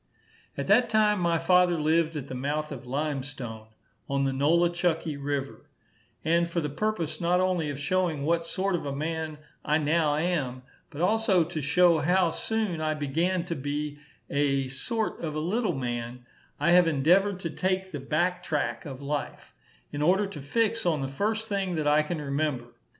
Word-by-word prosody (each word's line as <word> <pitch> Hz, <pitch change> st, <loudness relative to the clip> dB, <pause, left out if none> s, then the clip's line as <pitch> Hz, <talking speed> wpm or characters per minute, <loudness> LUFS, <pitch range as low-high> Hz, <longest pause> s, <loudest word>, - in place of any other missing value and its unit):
At 140 Hz, -, -2 dB
that 235 Hz, +4 st, +4 dB
time 215 Hz, -2 st, +3 dB
my 170 Hz, -1 st, +2 dB
father 175 Hz, 0 st, +3 dB
lived 160 Hz, +1 st, +2 dB
at 140 Hz, -2 st, -5 dB
the -, -, -7 dB
mouth 150 Hz, +4 st, -2 dB
of 130 Hz, -3 st, -8 dB
Lime 145 Hz, +1 st, -1 dB
Stone, 120 Hz, -6 st, -8 dB, 0.4 s
on 140 Hz, 0 st, +1 dB
the 135 Hz, -1 st, 0 dB
Nola 170 Hz, +6 st, +3 dB
chucky 165 Hz, -3 st, -1 dB
river; 140 Hz, -1 st, -4 dB, 0.6 s
and 170 Hz, +1 st, +2 dB
for 170 Hz, -, -1 dB
the 150 Hz, -3 st, -3 dB
purpose 190 Hz, -1 st, -2 dB
not 175 Hz, +1 st, +2 dB
only 180 Hz, -4 st, +1 dB
of 140 Hz, -1 st, -5 dB
showing 165 Hz, -1 st, 0 dB
what 165 Hz, +2 st, +1 dB
sort 190 Hz, +3 st, -1 dB
of 175 Hz, -, -1 dB
a 140 Hz, -, -3 dB
man 160 Hz, +1 st, -3 dB, 0.3 s
I 150 Hz, -, +2 dB
now 155 Hz, 0 st, +2 dB
am, 150 Hz, -6 st, -1 dB, 0.3 s
but 150 Hz, +1 st, -7 dB
also 195 Hz, -2 st, +3 dB
to 160 Hz, -1 st, -4 dB
show 170 Hz, +3 st, +4 dB
how 175 Hz, +3 st, +3 dB
soon 215 Hz, -4 st, -2 dB
I 155 Hz, 0 st, 0 dB
began 165 Hz, +5 st, 0 dB
to 170 Hz, -, -3 dB
be 145 Hz, +1 st, -3 dB, 0.3 s
a 140 Hz, -2 st, +1 dB
sort 220 Hz, -, -2 dB
of 155 Hz, -2 st, -3 dB
a -, -, -1 dB
little 185 Hz, +3 st, 0 dB
man, 120 Hz, -1 st, -4 dB, 0.3 s
I 160 Hz, +4 st, +3 dB
have 175 Hz, -1 st, +6 dB
endeavoured 180 Hz, +6 st, +3 dB
to 165 Hz, -, -3 dB
take 190 Hz, +2 st, -1 dB
the 145 Hz, -, -4 dB
back 175 Hz, +6 st, 0 dB
track 130 Hz, -9 st, -2 dB
of 135 Hz, 0 st, -8 dB
life, 145 Hz, +1 st, -4 dB, 0.4 s
in 145 Hz, -, -4 dB
order 190 Hz, +6 st, +3 dB
to 195 Hz, -7 st, -7 dB
fix 225 Hz, +10 st, 0 dB
on 160 Hz, -5 st, +1 dB
the 135 Hz, -, -2 dB
first 215 Hz, +10 st, -2 dB
thing 195 Hz, -4 st, -1 dB
that 155 Hz, -2 st, -1 dB
I 150 Hz, +1 st, +5 dB
can 155 Hz, +2 st, -3 dB
remember. 140 Hz, -4 st, -2 dB
160 Hz, 185 wpm, -27 LUFS, 145-180 Hz, 0.6 s, have